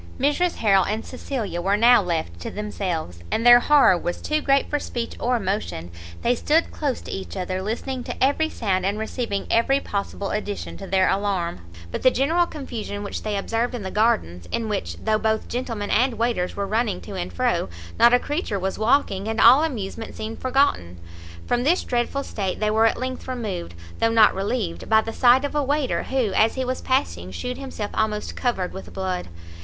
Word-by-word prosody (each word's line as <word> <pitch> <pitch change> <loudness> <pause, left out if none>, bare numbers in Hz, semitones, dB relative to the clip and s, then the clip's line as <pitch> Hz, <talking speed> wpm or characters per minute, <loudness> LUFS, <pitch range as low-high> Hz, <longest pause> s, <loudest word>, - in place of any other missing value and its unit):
Mrs 295 +6 +1
Harrel 195 -4 +4
and 215 +4 -2
Cecilia 235 -9 -4
were 195 +3 +2
now 240 +1 +6
left 160 - -3
to - - -5
themselves, 180 - -4
and 230 - -1
their 240 0 +10
horror 285 -7 +5
was 175 0 -3
too 305 0 -1
great 275 -1 +2
for 295 - -1
speech 235 -4 -4
or 245 0 +1
motion; 190 - -3 0.3
they 240 - +3
stood 305 +7 +1
close 285 -4 -2
to - - -8
each 195 +1 -6
other, 185 0 -2
listening 245 +5 -3
to - - -3
every 300 +4 +2
sound 190 -9 -1
and 200 +2 0
receiving 220 -2 -3
every 270 +4 +3
possible 200 -3 -4
addition 205 -1 -4
to 195 - -8
their 190 0 +3
alarm, 190 - -1 0.3
by - - -3
the 255 - +5
general 325 +7 +2
confusion 225 -9 -6
which 200 - -5
they 210 -2 -2
observed 230 +5 -1
in 230 - -5
the 190 - -5
gardens, 90 - +1
in 230 -1 -1
which, 85 - -3
though 215 - 0
both 220 0 0
gentlemen 230 -5 -3
and 250 +1 +2
waiters 230 -6 -1
were 200 - -2
running 220 - 0
to 85 - -9
and 90 +1 -4
fro, 85 - 0 0.3
not 235 +1 +7
a 245 - +6
creature 290 - -2
was 190 +1 -3
walking, 215 -4 +2
and 225 0 -2
all 260 +6 +8
amusement 225 -7 -4
seemed 220 +1 -6
forgotten. 255 - +1 0.5
From 245 0 0
this 335 +7 +2
dreadful 245 +3 -1
state 195 -7 -3
they 215 0 +1
were 220 +1 +4
at - - 0
length 255 0 -5
removed, 210 - -4 0.2
though 230 - +3
not 225 -2 +5
relieved, 195 -2 -3
by 220 0 +6
the 225 0 -6
sight 255 +3 +5
of 285 - -4
a 295 - +1
waiter, 285 0 0
who, 255 -7 -1
as 220 +3 +3
he 260 -1 -1
was 255 +1 -3
passing 85 - -1
shewed 250 - -5
himself 260 -6 -5
almost 215 -1 -1
covered 195 -8 -1
with 190 - -9
blood! 185 -1 -3
220 Hz, 200 wpm, -23 LUFS, 195-255 Hz, 0.5 s, their